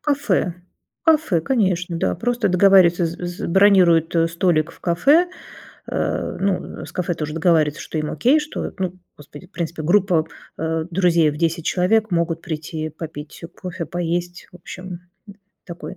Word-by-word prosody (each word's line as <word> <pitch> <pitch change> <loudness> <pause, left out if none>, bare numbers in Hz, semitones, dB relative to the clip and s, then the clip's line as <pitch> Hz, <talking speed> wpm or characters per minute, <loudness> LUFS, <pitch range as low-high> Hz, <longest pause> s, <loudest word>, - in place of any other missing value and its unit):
Кафе, 275 - 0 0.5
кафе, 310 - +3
конечно, 180 -5 0
да, - - 0
просто 235 +2 -1
договариваться, 180 -2 +5
з 165 - -6
з 175 0 -5
бронируют, 180 -4 +4
э, 165 0 +4
столик 170 -2 +1
в - - -20
кафе, 280 - +3 0.6
э, - - -2
ну, 195 -1 -2
с - - -11
кафе 180 -1 -2
тоже 150 -1 -4
договариваются, 160 -2 +2
что - - -5
им 155 -1 -2
окей, 270 +6 +3
что, 300 0 -5
ну, 185 -1 -3 0.2
господи, 150 +4 -13
в - - -36
принципе 165 -2 -4
группа, 175 -1 +2 0.3
э, 160 0 -2
друзей 170 -3 +3
в 150 - -8
10 165 0 -1
человек 215 +3 +1
могут 165 -1 0
прийти 155 -1 -5
попить 155 -1 -9 0.2
кофе, 180 -2 -5
поесть. 175 +2 -3
В - - -16
общем, 180 +1 -10
м, 180 -2 -7 0.7
такой. 170 +1 -8
175 Hz, 160 wpm, -21 LUFS, 165-190 Hz, 0.7 s, договариваться